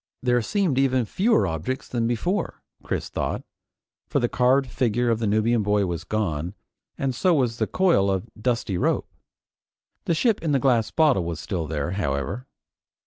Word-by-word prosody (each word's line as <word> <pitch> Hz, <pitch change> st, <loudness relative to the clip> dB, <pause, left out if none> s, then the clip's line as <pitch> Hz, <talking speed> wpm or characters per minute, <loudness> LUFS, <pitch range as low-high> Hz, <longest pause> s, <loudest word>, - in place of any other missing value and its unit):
There 125 Hz, -1 st, +3 dB
seemed 175 Hz, -, 0 dB
even 130 Hz, -3 st, +2 dB
fewer 190 Hz, -, +2 dB
objects 85 Hz, -, -3 dB
than 115 Hz, -2 st, -1 dB
before, 175 Hz, -, -2 dB, 0.2 s
Chris -, -, -3 dB
thought, -, -, -3 dB, 0.6 s
for 140 Hz, -, +1 dB
the 120 Hz, -, +1 dB
carved 130 Hz, +3 st, +3 dB
figure 120 Hz, -1 st, 0 dB
of 115 Hz, -, 0 dB
the 115 Hz, -, 0 dB
Nubian 110 Hz, +3 st, +2 dB
boy 105 Hz, -1 st, +2 dB
was 85 Hz, -2 st, -4 dB
gone, 90 Hz, -4 st, -2 dB, 0.4 s
and 135 Hz, -2 st, -1 dB
so 175 Hz, +7 st, +2 dB
was 125 Hz, -5 st, +1 dB
the -, -, 0 dB
coil 175 Hz, -, +3 dB
of 95 Hz, +3 st, -1 dB
dusty 110 Hz, -5 st, -1 dB
rope. -, -, +1 dB, 1.0 s
The 170 Hz, -, +1 dB
ship 225 Hz, +5 st, +2 dB
in 155 Hz, -3 st, 0 dB
the 135 Hz, -, +3 dB
glass 120 Hz, -5 st, +2 dB
bottle 150 Hz, -, +3 dB
was 85 Hz, -2 st, -4 dB
still 85 Hz, -4 st, -3 dB
there, 75 Hz, +1 st, -2 dB
however. 85 Hz, -, -2 dB
120 Hz, 170 wpm, -24 LUFS, 95-135 Hz, 1.0 s, There